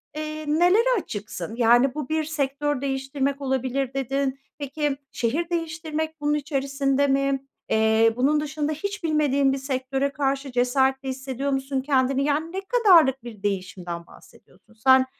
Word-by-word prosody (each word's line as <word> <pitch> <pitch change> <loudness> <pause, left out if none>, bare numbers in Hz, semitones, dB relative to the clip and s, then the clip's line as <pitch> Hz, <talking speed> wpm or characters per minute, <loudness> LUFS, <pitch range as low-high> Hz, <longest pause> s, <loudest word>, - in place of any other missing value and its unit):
eee, 310 0 -5
nelere 385 +10 +4
açıksın? 215 -1 -6
Yani, 240 +3 +4
bu 295 -4 -4
bir 315 0 +1
sektör 290 -2 -1
değiştirmek 270 +1 -2
olabilir 265 0 -1
dedin. 270 0 -1 0.2
Peki, 290 0 -2
şehir 305 +9 -1
değiştirmek 315 -2 -3
bunun 295 0 +1
içerisinde 275 -1 0
mi? 275 0 +1 0.2
Eee, 220 +1 +4
bunun 280 +5 +2
dışında 300 0 -2
hiç 400 +5 -5
bilmediğin 285 -3 +2
bir - - -1
sektöre 270 0 -1
karşı 275 0 -1
cesaretli 265 +2 +1
hissediyor 265 +1 -3
musun 270 0 -1
kendini? 270 -1 +1
Yani, 300 +3 0
ne 380 +2 -3
kadarlık 365 - +4
bir 220 -4 -10
değişimden 185 -3 -4
bahsediyorsun? 195 +4 -20
Sen, 260 +3 +5
275 Hz, 140 wpm, -24 LUFS, 260-300 Hz, 0.2 s, Sen